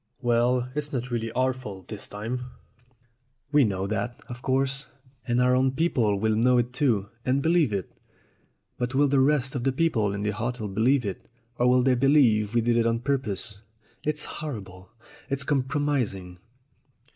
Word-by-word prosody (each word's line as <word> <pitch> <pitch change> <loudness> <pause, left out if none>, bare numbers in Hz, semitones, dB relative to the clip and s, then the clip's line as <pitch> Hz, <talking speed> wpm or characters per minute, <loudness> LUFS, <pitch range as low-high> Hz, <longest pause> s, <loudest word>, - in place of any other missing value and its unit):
"Well, 120 +1 +2
it's 145 0 -3
not 125 -2 -3
really 115 -1 -2
our 130 +1 +2
fault 105 -8 -9
this 105 -3 -7
time." 115 +5 -4 1.1
"We 150 -1 +5
know 95 -4 -1
that, 110 +4 -3
of 120 0 -8
course, 135 +1 0 0.4
and 120 +1 +1
our 125 0 +4
own 130 0 +2
people 120 -10 +1
will 110 +1 +1
know 125 +3 +4
it 120 +1 0
too, 115 -9 +1
and 130 +2 +1
believe 165 -6 +3
it. 100 -3 -3 0.9
But 125 +2 -2
will 145 +1 +4
the 140 0 +3
rest 135 0 +2
of 130 -4 -3
the 135 - +2
people 130 -8 +1
in 100 +1 -3
the 105 - 0
hotel 115 +1 -3
believe 115 +6 +2
it, 100 -3 -6 0.3
or 125 - +4
will 125 0 +4
they 130 0 +4
believe 120 -5 +3
we 120 - +4
did 120 +1 +2
it 115 0 +3
on 115 0 0
purpose? 115 -7 -2 0.4
It's 150 0 -1
horrible! 95 -11 -7 0.4
It's 140 0 -1
compromis 140 -4 0
ing!" 90 -1 -11
125 Hz, 175 wpm, -26 LUFS, 110-135 Hz, 1.1 s, We